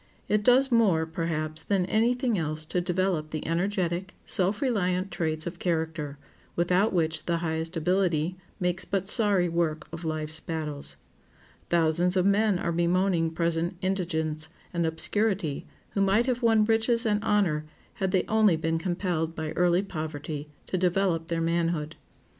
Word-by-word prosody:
It 210 Hz, 0 st, +2 dB
does 260 Hz, +4 st, +5 dB
more, 200 Hz, -9 st, +3 dB
perhaps, 160 Hz, -1 st, -3 dB
than 195 Hz, -3 st, +1 dB
any 225 Hz, +6 st, +2 dB
thing 245 Hz, -3 st, 0 dB
else 155 Hz, -3 st, -2 dB
to 180 Hz, +3 st, -1 dB
develop 180 Hz, -3 st, 0 dB
the 155 Hz, -1 st, -5 dB
energetic, 180 Hz, +1 st, -1 dB
self 195 Hz, +1 st, +2 dB
reliant 195 Hz, -8 st, 0 dB
traits 155 Hz, -1 st, -1 dB
of 175 Hz, 0 st, -6 dB
character, 160 Hz, -4 st, -2 dB, 0.4 s
without 180 Hz, +5 st, +2 dB
which 160 Hz, -3 st, -1 dB
the 170 Hz, -1 st, +1 dB
highest 165 Hz, +1 st, -3 dB
ability 175 Hz, -1 st, +1 dB, 0.2 s
makes 180 Hz, 0 st, +1 dB
but 195 Hz, -1 st, -2 dB
sorry 205 Hz, -5 st, +4 dB
work 165 Hz, -2 st, -1 dB
of 165 Hz, +1 st, -7 dB
life's 155 Hz, 0 st, -2 dB
battles. 155 Hz, -4 st, -2 dB, 0.7 s
Thousands 170 Hz, +2 st, +2 dB
of 185 Hz, -, +3 dB
men 200 Hz, 0 st, +3 dB
are 170 Hz, -, -2 dB
bemoaning 175 Hz, 0 st, +2 dB
present 170 Hz, +1 st, -1 dB
indigence 160 Hz, -5 st, -1 dB, 0.2 s
and 170 Hz, -1 st, +1 dB
obscurity 165 Hz, -1 st, -1 dB, 0.2 s
who 200 Hz, -, -1 dB
might 195 Hz, +4 st, +3 dB
have 250 Hz, -1 st, -1 dB
won 225 Hz, -2 st, +4 dB
riches 230 Hz, +2 st, +2 dB
and 210 Hz, -1 st, +1 dB
honor 175 Hz, -9 st, +1 dB, 0.3 s
had 190 Hz, -, -1 dB
they 185 Hz, -1 st, +2 dB
only 215 Hz, -5 st, +4 dB
been 160 Hz, +1 st, -1 dB
compelled 175 Hz, -2 st, -2 dB
by 155 Hz, -1 st, -4 dB
early 175 Hz, +1 st, +2 dB
poverty 155 Hz, -4 st, -5 dB, 0.2 s
to 185 Hz, -, -2 dB
develop 180 Hz, -2 st, +1 dB
their 165 Hz, -1 st, -1 dB
manhood. 165 Hz, -2 st, 0 dB
175 Hz, 155 wpm, -27 LUFS, 160-195 Hz, 0.7 s, does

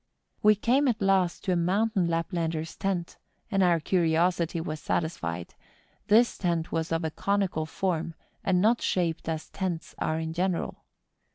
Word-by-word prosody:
We 210 Hz, 0 st, +6 dB
came 255 Hz, +7 st, +2 dB
at 230 Hz, -3 st, +1 dB
last 195 Hz, -3 st, +2 dB
to 190 Hz, -, 0 dB
a -, -, +3 dB
mountain 190 Hz, +2 st, +1 dB
Laplander's 165 Hz, -1 st, -2 dB
tent, 185 Hz, -3 st, -2 dB, 0.3 s
and 195 Hz, -2 st, +2 dB
our 175 Hz, -2 st, +4 dB
curiosity 170 Hz, 0 st, +1 dB
was 155 Hz, -2 st, -4 dB
satisfied: 90 Hz, -, -2 dB, 0.5 s
this 230 Hz, +3 st, +4 dB
tent 170 Hz, -3 st, -1 dB
was 165 Hz, 0 st, -2 dB
of 165 Hz, 0 st, 0 dB
a 160 Hz, -, -1 dB
conical 195 Hz, -4 st, 0 dB
form, 165 Hz, -1 st, -2 dB, 0.3 s
and 185 Hz, -2 st, +2 dB
not 225 Hz, +5 st, +3 dB
shaped 165 Hz, -3 st, -1 dB
as 160 Hz, -1 st, -4 dB
tents 180 Hz, -4 st, -3 dB
are 155 Hz, -, 0 dB
in 160 Hz, 0 st, -3 dB
general. 180 Hz, 0 st, -2 dB
175 Hz, 155 wpm, -28 LUFS, 160-195 Hz, 0.5 s, We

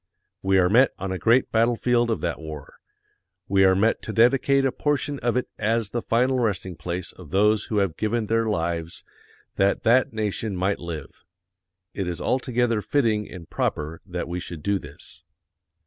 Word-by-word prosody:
We 95 Hz, 0 st, +2 dB
are 90 Hz, -1 st, +4 dB
met 120 Hz, +7 st, +4 dB
on 95 Hz, 0 st, -4 dB
a 95 Hz, -, -3 dB
great 120 Hz, +3 st, +3 dB
battlefield 120 Hz, +1 st, +2 dB
of 115 Hz, -, -1 dB
that 85 Hz, -1 st, -2 dB
war. 75 Hz, -3 st, -9 dB, 0.7 s
We 95 Hz, 0 st, +3 dB
are 95 Hz, 0 st, +5 dB
met 110 Hz, +4 st, +2 dB
to -, -, -5 dB
dedicate 135 Hz, +4 st, +3 dB
a 135 Hz, -, +2 dB
portion 145 Hz, 0 st, -1 dB
of 120 Hz, 0 st, 0 dB
it 125 Hz, -, -1 dB
as 110 Hz, -1 st, 0 dB
the 120 Hz, -, -2 dB
final 125 Hz, +3 st, +1 dB
resting 95 Hz, -6 st, -1 dB
place 85 Hz, +1 st, -4 dB
of 90 Hz, -5 st, -14 dB
those 105 Hz, +4 st, +2 dB
who 110 Hz, -, -2 dB
have 95 Hz, -5 st, 0 dB
given 110 Hz, +1 st, 0 dB
their 115 Hz, +1 st, +1 dB
lives 85 Hz, -4 st, -2 dB, 0.5 s
that 100 Hz, +1 st, +2 dB
that 125 Hz, +3 st, +4 dB
nation 110 Hz, -1 st, -2 dB
might 95 Hz, +2 st, 0 dB
live. 80 Hz, -5 st, -8 dB, 0.7 s
It 95 Hz, -3 st, -3 dB
is 85 Hz, -1 st, -4 dB
altogether 120 Hz, -3 st, 0 dB
fitting 110 Hz, -2 st, 0 dB
and 85 Hz, -4 st, -10 dB
proper 75 Hz, +2 st, -3 dB
that 90 Hz, -1 st, -4 dB
we 90 Hz, +1 st, -3 dB
should 85 Hz, -3 st, -8 dB
do 100 Hz, -1 st, +1 dB
this. 70 Hz, -3 st, -12 dB
105 Hz, 180 wpm, -24 LUFS, 90-115 Hz, 0.7 s, are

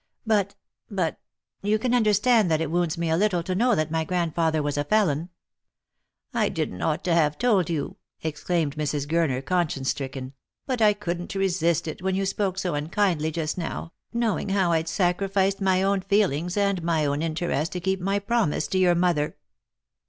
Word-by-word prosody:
But 205 Hz, -3 st, +1 dB, 0.2 s
— -, -, -63 dB
but 185 Hz, -6 st, -1 dB, 0.2 s
— -, -, -57 dB
you 210 Hz, +2 st, +2 dB
can 245 Hz, +3 st, -1 dB
understand 220 Hz, -2 st, +4 dB
that 160 Hz, -1 st, +2 dB
it 160 Hz, -2 st, -2 dB
wounds 170 Hz, -2 st, 0 dB
me 165 Hz, -1 st, -1 dB
a -, -, +3 dB
little 180 Hz, -2 st, +1 dB
to 185 Hz, -, -2 dB
know 235 Hz, +4 st, +3 dB
that 155 Hz, 0 st, -1 dB
my 160 Hz, 0 st, 0 dB
grandfather 165 Hz, -2 st, 0 dB
was 145 Hz, -1 st, -1 dB
a 145 Hz, -, 0 dB
felon." 170 Hz, -2 st, +1 dB, 0.5 s
" -, -, -55 dB, 0.3 s
I -, -, +2 dB
didn't 90 Hz, -, -3 dB
ought 155 Hz, -1 st, 0 dB
to 175 Hz, -1 st, +1 dB
have 150 Hz, -3 st, +2 dB
told 210 Hz, -9 st, +2 dB
you," 160 Hz, -4 st, -3 dB, 0.3 s
exclaimed 160 Hz, -1 st, -1 dB
Mrs. 150 Hz, -2 st, -1 dB
Gurner, 150 Hz, -5 st, 0 dB
conscience 150 Hz, -6 st, 0 dB
stricken, 135 Hz, -1 st, -6 dB, 0.2 s
" -, -, -63 dB
but 255 Hz, -4 st, -2 dB
I 210 Hz, -1 st, +6 dB
couldn't 180 Hz, -3 st, -4 dB
resist 170 Hz, -4 st, +1 dB
it, 155 Hz, -, -5 dB
when 190 Hz, 0 st, 0 dB
you 195 Hz, 0 st, 0 dB
spoke 195 Hz, -1 st, -1 dB
so 185 Hz, -2 st, -1 dB
unkindly 160 Hz, +1 st, 0 dB
just 160 Hz, +2 st, -3 dB
now, 165 Hz, 0 st, -5 dB, 0.2 s
knowing 230 Hz, -4 st, -1 dB
how 190 Hz, -3 st, +2 dB
I'd 165 Hz, 0 st, +1 dB
sacrificed 195 Hz, +3 st, +1 dB
my 190 Hz, -1 st, +2 dB
own 195 Hz, 0 st, +2 dB
feel 200 Hz, +1 st, +2 dB
ings 170 Hz, +7 st, -3 dB
and 200 Hz, -3 st, +1 dB
my 165 Hz, -2 st, +1 dB
own 145 Hz, +1 st, 0 dB
interest 165 Hz, -1 st, -1 dB
to 180 Hz, -, -2 dB
keep 190 Hz, +1 st, -1 dB
my 195 Hz, +2 st, +1 dB
promise 200 Hz, -7 st, 0 dB
to 190 Hz, -, +1 dB
your 180 Hz, -2 st, +4 dB
mother." 170 Hz, -4 st, +1 dB
175 Hz, 195 wpm, -25 LUFS, 160-195 Hz, 0.5 s, I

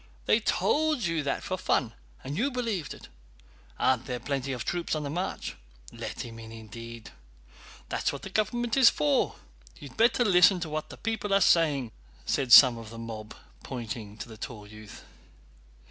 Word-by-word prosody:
They -, -, +4 dB
told 310 Hz, -4 st, +1 dB
you 165 Hz, -3 st, 0 dB
that 140 Hz, -1 st, -2 dB
for -, -, -3 dB
fun, -, -, 0 dB, 0.3 s
and 140 Hz, +2 st, -5 dB
you 240 Hz, -, +1 dB
believed 230 Hz, -, -3 dB
it! -, -, -14 dB, 0.7 s
Aren't 130 Hz, 0 st, +1 dB
there 125 Hz, -2 st, -3 dB
plenty 135 Hz, -1 st, -3 dB
of 125 Hz, -2 st, -4 dB
troops 175 Hz, -2 st, -1 dB
on 155 Hz, -, -3 dB
the 140 Hz, -, -4 dB
march? 180 Hz, +4 st, -4 dB, 0.4 s
Let -, -, -6 dB
him 115 Hz, -1 st, -8 dB
in, 110 Hz, 0 st, -10 dB
indeed! 115 Hz, +1 st, -10 dB, 0.8 s
That's -, -, 0 dB
what -, -, -8 dB
the 195 Hz, -, -7 dB
government 230 Hz, +3 st, 0 dB
is 265 Hz, -3 st, +8 dB
for. 150 Hz, -1 st, +1 dB, 0.4 s
You'd 140 Hz, -3 st, -12 dB
better 235 Hz, +2 st, +4 dB
listen 180 Hz, -1 st, +6 dB
to 160 Hz, -, -3 dB
what 155 Hz, 0 st, -6 dB
people 220 Hz, -2 st, -2 dB
are -, -, +5 dB
saying," 150 Hz, -, +3 dB, 0.3 s
said 130 Hz, -, -1 dB
some 125 Hz, -2 st, +9 dB
of 115 Hz, -2 st, -10 dB
the 115 Hz, -, -10 dB
mob 110 Hz, -2 st, -7 dB, 0.3 s
pointing 110 Hz, -4 st, -6 dB
to -, -, -7 dB
the 110 Hz, -2 st, -11 dB
tall 110 Hz, -2 st, -8 dB
youth. 105 Hz, 0 st, -12 dB
140 Hz, 175 wpm, -28 LUFS, 115-190 Hz, 0.8 s, some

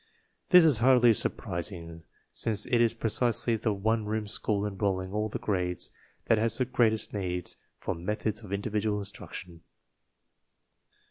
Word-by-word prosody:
This 180 Hz, -3 st, +8 dB
is 145 Hz, -8 st, +5 dB
hardly 120 Hz, -1 st, +6 dB
surprising, 85 Hz, -4 st, -3 dB, 0.3 s
since 105 Hz, -2 st, -1 dB
it 120 Hz, -1 st, +2 dB
is 115 Hz, -1 st, +3 dB
pre 115 Hz, -1 st, -2 dB
cisely 120 Hz, 0 st, +2 dB
the 110 Hz, 0 st, -1 dB
one 110 Hz, +2 st, 0 dB
room 110 Hz, 0 st, -2 dB
school 105 Hz, -1 st, -1 dB
enrolling 95 Hz, -2 st, -2 dB
all 105 Hz, +1 st, -1 dB
the -, -, -3 dB
grades 90 Hz, -4 st, -2 dB, 0.3 s
that 110 Hz, -, +3 dB
has 115 Hz, 0 st, +2 dB
the 130 Hz, -, +1 dB
greatest 110 Hz, -4 st, +1 dB
need 90 Hz, -3 st, -3 dB, 0.2 s
for -, -, -3 dB
methods 105 Hz, +5 st, -3 dB
of 105 Hz, -4 st, -11 dB
individual 105 Hz, +1 st, -1 dB
instruc 100 Hz, 0 st, -8 dB
tion. 85 Hz, -3 st, -9 dB
105 Hz, 150 wpm, -29 LUFS, 95-115 Hz, 0.3 s, This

